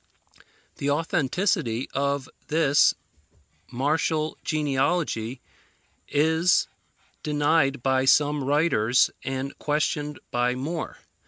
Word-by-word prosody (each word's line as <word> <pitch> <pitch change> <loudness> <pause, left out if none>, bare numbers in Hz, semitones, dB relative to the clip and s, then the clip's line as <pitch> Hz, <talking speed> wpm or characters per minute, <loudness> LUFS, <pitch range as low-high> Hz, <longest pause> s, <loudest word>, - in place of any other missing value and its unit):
The 140 - -2
authenticity 145 - 0
of 140 0 -1 0.2
this 150 -2 +3 0.8
martial 155 +4 0
genealogy 140 -4 -1 0.7
is 160 +4 +2 0.5
denied 145 -3 +1
by 130 0 +2
some 145 +1 +3
writers, 130 -5 +2
and 135 +1 -4
questioned 150 0 -1
by 120 +1 +1
more. 155 +6 -4
145 Hz, 80 wpm, -25 LUFS, 130-155 Hz, 0.8 s, this